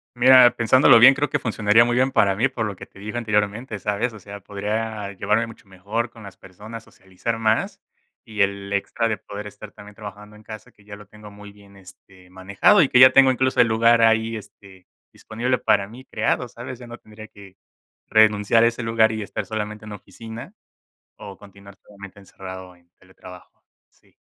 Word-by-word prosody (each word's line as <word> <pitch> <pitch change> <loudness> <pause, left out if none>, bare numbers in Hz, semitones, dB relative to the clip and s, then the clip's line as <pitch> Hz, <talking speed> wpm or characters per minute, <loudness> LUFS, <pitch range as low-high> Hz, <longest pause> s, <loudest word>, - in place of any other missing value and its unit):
Mira, 125 0 +6
pensándolo 115 +1 +5
bien, 130 +3 +8
creo 145 +2 -2
que 145 - -1
funcionaría 115 -1 +2
muy 120 - -1
bien 130 +2 +1
para 100 -6 +2
mí, 125 +6 +1
por 115 -4 -4
lo 105 -2 -5
que - - -11
te 100 - -20
dije 110 +3 -7
anteriormente, 105 0 -2
¿sabes? 105 +4 -2
O 110 - -13
sea, 100 0 -11
podría 105 +1 -5
llevarme 105 +4 -1
mucho 110 -3 -16
mejor 105 +5 -4
con 115 -2 -16
las 100 -2 -12
personas, 110 +4 -12
socializar 95 +5 -7
más 110 0 -1 0.5
y 105 -2 -4
el 100 0 -1
extra 115 +3 -2
de 110 -2 -2
poder 105 +2 -9
estar 105 0 -12
también 100 0 -15
trabajando 105 0 -11
en 105 - -17
casa, 110 0 -11
que 105 - -25
ya 100 0 -11
lo 105 - -16
tengo 105 0 -15
muy 105 0 -14
bien, 100 -1 -19
este, 95 -1 -19
manejado 95 - +2
y 140 - +2
que 125 - +3
ya 130 0 +8
tengo 135 0 +6
incluso 130 +1 +1
el - - +3
lugar 115 +1 +3
ahí, 115 0 +2
este, 95 -3 -14 0.3
disponible 120 +3 -3
para 100 - +1
mí 120 +4 -13
creado, 120 0 -2
¿sabes? 120 +2 -9
Ya 120 - -12
no 120 0 -10
tendría 110 0 -14
que 100 -3 -16 0.5
renunciar 110 +1 +3
a - - +5
ese 120 +1 -4
lugar 115 -1 +1
y 110 - -5
estar - - -6
solamente 105 0 -6
en 105 - -9
oficina 115 - -11 0.6
o 100 -1 -11
continuar 100 0 -16
solamente 100 -1 -14
encerrado 95 -2 -11
en 85 0 -31
teletrabajo. 90 -1 -16 0.2
Sí. - - -32
105 Hz, 200 wpm, -21 LUFS, 100-115 Hz, 0.6 s, bien